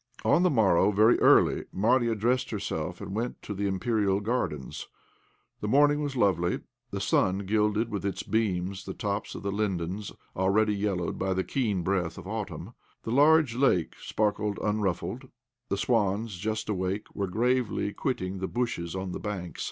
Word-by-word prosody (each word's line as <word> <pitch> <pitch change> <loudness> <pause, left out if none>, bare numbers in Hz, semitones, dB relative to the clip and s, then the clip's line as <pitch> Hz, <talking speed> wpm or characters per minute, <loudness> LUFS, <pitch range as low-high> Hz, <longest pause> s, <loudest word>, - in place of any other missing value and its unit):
On 170 - +4
the 180 - +4
morrow, 100 - +4
very 110 +3 +5
early, - - +5
Marya 115 +3 +2
dressed 120 +4 +1
herself - - -4
and - - -6
went 115 +4 -3
to 105 - -5
the 100 0 -1
Imperial 100 0 +1
Gardens. 100 - -3 0.7
The 105 - -3
morning 145 +5 +4
was 145 -2 -3
lovely. 90 -7 +1 0.3
The 100 - -4
sun 95 0 +1
gilded 105 +2 +1
with 100 -3 -3
its 100 -1 -2
beams 100 -3 -1
the 95 - -6
tops 100 0 -3
of - - -7
the 100 - -1
lindens, 100 -1 -2 0.2
already 105 +3 +2
yellowed 100 -4 -2
by 95 0 0
the 95 - 0
keen 105 -9 -1
breath 90 -2 -1
of 95 0 -9
autumn. 110 0 -5 0.3
The 115 - -4
large 145 0 +5
lake 120 - +2
sparkled 105 -1 -1
unruffled; 105 +3 -1 0.4
the 100 - 0
swans, 105 -2 0
just 110 +2 -2
awake, 95 0 -2
were 100 -1 -2
gravely 120 0 0
quitting 95 -7 -2
the 95 - -2
bushes 95 -9 -2
on 95 -1 -3
the - - -4
bank. 95 -4 -5
105 Hz, 165 wpm, -28 LUFS, 95-115 Hz, 0.7 s, very